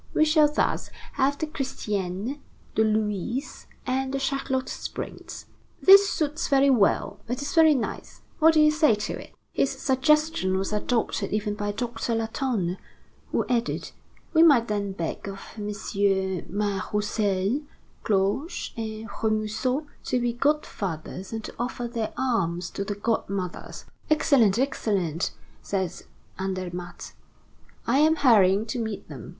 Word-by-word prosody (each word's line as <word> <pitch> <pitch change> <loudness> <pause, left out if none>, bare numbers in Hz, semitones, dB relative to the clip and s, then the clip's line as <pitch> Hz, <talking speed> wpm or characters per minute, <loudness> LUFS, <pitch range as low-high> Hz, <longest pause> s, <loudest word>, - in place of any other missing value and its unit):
We 310 - +5
shall 305 -1 +4
thus - - 0 0.2
have 280 +2 +1
the 315 - -1
Christiane, 230 - -3 0.3
the 220 - +3
Louise, 215 - -1 0.2
and 265 0 -1
the 275 - -1
Charlotte 270 -1 -1
Springs. - - -6 0.3
This 395 +1 +8
suits 305 +1 -1
very 275 0 +4
well; 220 -6 +2
it 245 +2 -2
is 285 - -4
very 320 -2 +6
nice. 240 - -5 0.2
What 320 +1 +6
do 310 - +6
you 305 0 +6
say 305 -7 +4
to 210 - -4
it?" - - -15 0.2
His 275 - +2
suggestion 270 -5 +2
was 195 +2 -2
adopted 215 -2 -1
even 210 0 -1
by 205 0 -2
Doctor 230 +1 -2
Latonne, 225 -5 -1 0.5
who - - +1
added: 235 -1 -1 0.4
"We 320 - +6
might 280 -8 +6
then 200 -2 -1
beg 170 +1 -4
of 195 - -6 0.2
MM. 200 -3 -1
Mas 200 -1 -1
Roussel, 210 +3 0 0.4
Cloche, 205 - 0
and 220 -1 -5
Remusot 220 +7 -1 0.2
to 250 - +1
be 240 -1 0
godfathers 195 - -2
and 225 -1 -4
to - - -7
offer 245 0 -3
their 230 -2 -3
arms 175 -9 0
to 200 - -3
the 205 0 -3
godmothers." 200 -4 -3 0.2
"Excellent, 265 -9 +4
excellent," 195 - 0 0.3
said 190 -3 -2 0.5
Andermatt. 180 -2 -5 0.7
"I 265 +4 +3
am 315 +2 +5
hurrying 215 -8 +5
to 225 +2 -3
meet 220 -3 -4
them. - - -9
225 Hz, 140 wpm, -26 LUFS, 200-270 Hz, 0.7 s, This